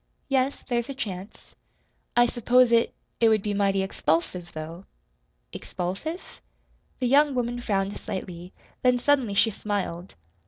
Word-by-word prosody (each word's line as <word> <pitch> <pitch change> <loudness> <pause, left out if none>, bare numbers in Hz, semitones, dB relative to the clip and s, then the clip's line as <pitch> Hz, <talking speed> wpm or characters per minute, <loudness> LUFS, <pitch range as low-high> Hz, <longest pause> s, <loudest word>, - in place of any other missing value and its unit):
"Yes, 270 0 +1
there's 240 0 -1
a 275 - -4
chance." 195 -5 -7 0.6
"I 240 - +7
s'pose 245 +1 +3
it 230 0 +4 0.3
it 230 - +5
would 215 -2 +3
be 210 - -1
mighty 195 -1 +2
expulsive, 175 -1 -1
though." 165 +4 -7 0.7
"Expulsive?" 200 - -5 0.6
The 255 - -1
young 285 +2 +4
woman 240 0 -1
frowned 200 -3 -1
slightly; 180 -1 -6 0.3
then 250 -1 +4
suddenly 250 -5 +2
she 225 +3 +4
smiled. 195 -4 -4
215 Hz, 130 wpm, -26 LUFS, 190-250 Hz, 0.7 s, I